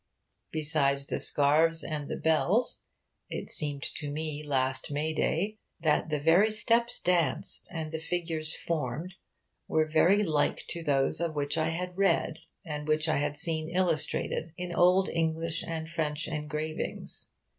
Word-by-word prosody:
Besides 145 Hz, -3 st, +2 dB
the -, -, -1 dB
scarves 160 Hz, +3 st, +4 dB
and 150 Hz, -3 st, -4 dB
the -, -, -2 dB
bells, 160 Hz, -, +2 dB, 0.4 s
it -, -, -5 dB
seemed 145 Hz, -2 st, -2 dB
to 145 Hz, -, -4 dB
me 150 Hz, 0 st, -4 dB
last 130 Hz, -3 st, 0 dB
May 150 Hz, +2 st, -1 dB
day 205 Hz, +7 st, -1 dB, 0.2 s
that 155 Hz, 0 st, +1 dB
the 150 Hz, -1 st, 0 dB
very 170 Hz, +8 st, +5 dB
steps 230 Hz, +3 st, +3 dB
danced 175 Hz, -5 st, 0 dB
and 160 Hz, -2 st, -5 dB
figures 160 Hz, -1 st, -3 dB
formed 160 Hz, +2 st, -3 dB, 0.5 s
were 155 Hz, 0 st, +2 dB
very 170 Hz, +7 st, +4 dB
like 155 Hz, -6 st, 0 dB
to 170 Hz, -, -4 dB
those 140 Hz, -1 st, +1 dB
of 165 Hz, -2 st, -1 dB
which 145 Hz, 0 st, -1 dB
I 160 Hz, 0 st, +1 dB
had 180 Hz, +2 st, -4 dB
read, 195 Hz, -4 st, +2 dB, 0.3 s
and 150 Hz, -2 st, -5 dB
which 155 Hz, +1 st, +1 dB
I 155 Hz, -, +2 dB
had 145 Hz, +1 st, -1 dB
seen 160 Hz, 0 st, -1 dB
illustrated 170 Hz, -2 st, 0 dB
in 180 Hz, -1 st, -4 dB
old 180 Hz, +2 st, +4 dB
English 165 Hz, 0 st, -1 dB
and 160 Hz, -1 st, -4 dB
French 155 Hz, -2 st, -2 dB
engravings. 155 Hz, 0 st, -4 dB
160 Hz, 145 wpm, -29 LUFS, 150-170 Hz, 0.5 s, very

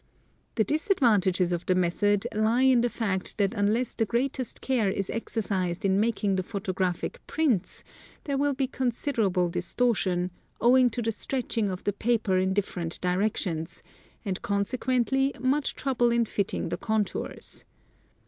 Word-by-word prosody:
The 220 Hz, -, +3 dB
disadvantages 215 Hz, -, +2 dB
of 175 Hz, -1 st, -3 dB
the 185 Hz, -, +3 dB
method 195 Hz, +4 st, +1 dB
lie 220 Hz, +4 st, +2 dB
in 260 Hz, -2 st, +5 dB
the 240 Hz, -, +1 dB
fact 195 Hz, -6 st, -2 dB
that 200 Hz, 0 st, +1 dB
unless 220 Hz, +3 st, +1 dB
the 225 Hz, -, 0 dB
great 255 Hz, +5 st, 0 dB
est 255 Hz, -, -4 dB
care 245 Hz, -7 st, +1 dB
is 195 Hz, 0 st, -2 dB
exercised 200 Hz, -5 st, -2 dB
in 195 Hz, 0 st, +3 dB
making 210 Hz, -3 st, +1 dB
the -, -, +1 dB
photographic 190 Hz, -, -3 dB
prints 275 Hz, -, 0 dB, 0.4 s
there 280 Hz, -, -2 dB
will 285 Hz, 0 st, +1 dB
be 270 Hz, -, +1 dB
considerable 235 Hz, -8 st, 0 dB
distortion, 180 Hz, -1 st, 0 dB, 0.3 s
owing 250 Hz, +1 st, +5 dB
to 240 Hz, +1 st, -4 dB
the 225 Hz, -, 0 dB
stretching 230 Hz, -2 st, -2 dB
of 185 Hz, -1 st, -5 dB
the 205 Hz, -, 0 dB
paper 215 Hz, -3 st, +1 dB
in 190 Hz, 0 st, +1 dB
different 180 Hz, -4 st, -2 dB
directions, 180 Hz, -3 st, -1 dB, 0.4 s
and 190 Hz, -3 st, -2 dB
consequently 250 Hz, +5 st, 0 dB
much 270 Hz, +3 st, 0 dB
trouble 245 Hz, -4 st, +1 dB
in 235 Hz, 0 st, +2 dB
fitting 200 Hz, -2 st, -2 dB
the 175 Hz, -, -2 dB
contours. 215 Hz, +1 st, -3 dB
215 Hz, 150 wpm, -27 LUFS, 190-245 Hz, 0.4 s, in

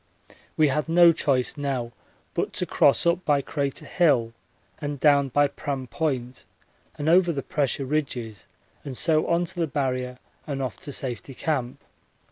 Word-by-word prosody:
We 155 Hz, -2 st, +4 dB
had 150 Hz, +4 st, -1 dB
no 170 Hz, 0 st, +7 dB
choice 135 Hz, -5 st, 0 dB
now 135 Hz, -5 st, -2 dB, 0.4 s
but -, -, -2 dB
to -, -, -2 dB
cross -, -, +3 dB
up 170 Hz, +2 st, +2 dB
by 145 Hz, -2 st, +2 dB
Crater 140 Hz, -2 st, -3 dB
Hill 130 Hz, -10 st, +2 dB, 0.5 s
and 145 Hz, -2 st, -4 dB
down 140 Hz, -1 st, +4 dB
by 145 Hz, +3 st, +3 dB
Pram 140 Hz, -2 st, -4 dB
Point 130 Hz, -2 st, -3 dB, 0.5 s
and 145 Hz, -, -3 dB
over 175 Hz, +1 st, +5 dB
the 140 Hz, -4 st, -3 dB
pressure 140 Hz, -2 st, -1 dB
ridges 125 Hz, -8 st, -3 dB, 0.4 s
and 135 Hz, -3 st, -5 dB
so 155 Hz, -2 st, +2 dB
on 170 Hz, +1 st, +2 dB
to 175 Hz, -, -6 dB
the 165 Hz, -, +1 dB
Barrier 130 Hz, -3 st, -2 dB, 0.3 s
and 140 Hz, -2 st, -3 dB
off 130 Hz, -4 st, -4 dB
to 145 Hz, -, -6 dB
Safety 130 Hz, 0 st, -4 dB
Camp. 130 Hz, -6 st, -2 dB
140 Hz, 160 wpm, -25 LUFS, 130-155 Hz, 0.5 s, no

